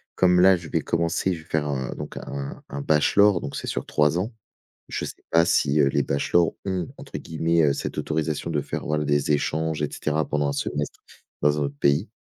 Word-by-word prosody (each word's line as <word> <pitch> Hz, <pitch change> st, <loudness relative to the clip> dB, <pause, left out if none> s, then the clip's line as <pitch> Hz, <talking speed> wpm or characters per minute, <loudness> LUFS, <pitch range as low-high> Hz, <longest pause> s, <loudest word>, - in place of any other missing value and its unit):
comme 90 Hz, -1 st, +4 dB
là, 95 Hz, 0 st, +7 dB
je 85 Hz, -, -9 dB
vais 80 Hz, -, 0 dB
commencer, 85 Hz, +4 st, 0 dB
je 80 Hz, -2 st, -7 dB
vais -, -, -25 dB
faire 80 Hz, -1 st, 0 dB
un 65 Hz, -3 st, -2 dB
donc, -, -, -7 dB
un 70 Hz, 0 st, -6 dB
un 70 Hz, 0 st, -5 dB
bachelor 90 Hz, +6 st, +4 dB
donc 70 Hz, -, -6 dB
c'est -, -, -5 dB
sur -, -, -2 dB
3 75 Hz, +3 st, +2 dB
ans. 110 Hz, +5 st, -3 dB, 0.6 s
Je -, -, -3 dB
sais -, -, -6 dB, 0.2 s
pas 85 Hz, 0 st, +5 dB
si, 75 Hz, -2 st, +2 dB
heu, 70 Hz, -, +5 dB
les 70 Hz, 0 st, +1 dB
bachelors 85 Hz, +4 st, +2 dB
ont, 95 Hz, -4 st, -2 dB
entre -, -, -7 dB
guillemets, 80 Hz, +1 st, +1 dB
heu, 70 Hz, -2 st, +4 dB
«cette -, -, -4 dB
autorisation 80 Hz, +1 st, -2 dB
de 75 Hz, -3 st, 0 dB
faire -, -, -5 dB
voilà, 75 Hz, 0 st, 0 dB
des 75 Hz, 0 st, +2 dB
échanges 80 Hz, +1 st, 0 dB
et 75 Hz, -, -1 dB
cetera 75 Hz, 0 st, -1 dB
pendant 75 Hz, -1 st, 0 dB
1 -, -, -2 dB
semestre, 75 Hz, +1 st, -3 dB, 0.4 s
dans 75 Hz, +1 st, +3 dB
un -, -, +1 dB
autre 70 Hz, 0 st, -3 dB
pays», 70 Hz, +8 st, +2 dB
75 Hz, 220 wpm, -24 LUFS, 75-85 Hz, 0.6 s, là